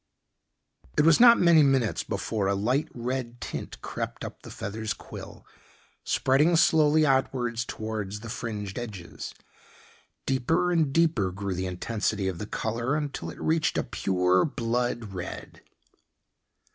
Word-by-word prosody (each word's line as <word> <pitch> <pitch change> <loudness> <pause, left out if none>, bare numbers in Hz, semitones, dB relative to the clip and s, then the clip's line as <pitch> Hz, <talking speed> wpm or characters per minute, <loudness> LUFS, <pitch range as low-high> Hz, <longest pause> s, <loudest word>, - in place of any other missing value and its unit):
It - - +5
was 165 -1 +6
not 235 -1 +8
many 170 -3 +6
minutes 135 -6 +2
before 105 -3 -2
a 100 - +1
light 125 +9 +1
red 120 0 -4
tint - - -6
crept - - -5
up - - -9
the - - -11
feather's 110 +2 -4
quill, - - -10 0.6
spreading 150 +6 +3
slowly 155 -1 +4
outwards 130 -4 +1
towards 105 -2 -4
the 115 - -8
fringed 105 -3 -4
edges. 100 -8 -7 0.9
Deeper 160 +8 +1
and 160 -5 +2
deeper 150 - +2
grew 100 +1 -3
the 95 +1 -2
intensity 100 +2 -2
of 95 -3 -3
the 105 - -5
color 115 +6 -1
until 145 -2 -3
it - - -10
reached 160 0 +1
a - - +1
pure 90 -1 +2
blood 120 -5 -2
red. 90 -2 -7
120 Hz, 135 wpm, -27 LUFS, 105-145 Hz, 0.9 s, not